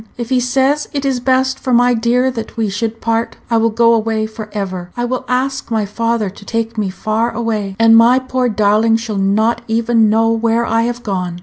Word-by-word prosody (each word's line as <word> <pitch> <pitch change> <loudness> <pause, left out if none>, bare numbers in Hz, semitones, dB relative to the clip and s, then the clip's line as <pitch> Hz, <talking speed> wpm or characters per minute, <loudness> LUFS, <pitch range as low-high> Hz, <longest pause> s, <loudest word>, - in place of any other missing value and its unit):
"If 240 -1 -5
he 255 - +3
says 265 +4 0
it 280 -1 -2
is 265 -2 0
best 260 +1 +1
for 260 - -3
my 245 0 +4
dear 240 +3 +1
that 225 -3 -7
we 220 -2 0
should 225 +3 -4
part, 230 0 -1 0.2
I 230 - +3
will 225 0 +2
go 230 +1 +3
away 220 -1 0
for 220 -1 -8
ever. 185 -4 -5
I 240 - -1
will 255 +1 -3
ask 260 +2 -2
my 220 -2 0
father 230 0 -1
to 200 - -14
take 230 +1 -3
me 210 -3 -1
far 215 +4 -1
away, 220 -4 -3
and 225 0 +5
my 235 +3 +6
poor 255 -1 -1
darling 215 +1 +2
shall 225 -3 -4
not 215 +4 +1
even 225 -1 +2
know 225 +1 +2
where 230 +1 +1
I 225 0 +1
have 240 0 -6
gone. 180 -4 -3
230 Hz, 215 wpm, -16 LUFS, 215-245 Hz, 0.2 s, my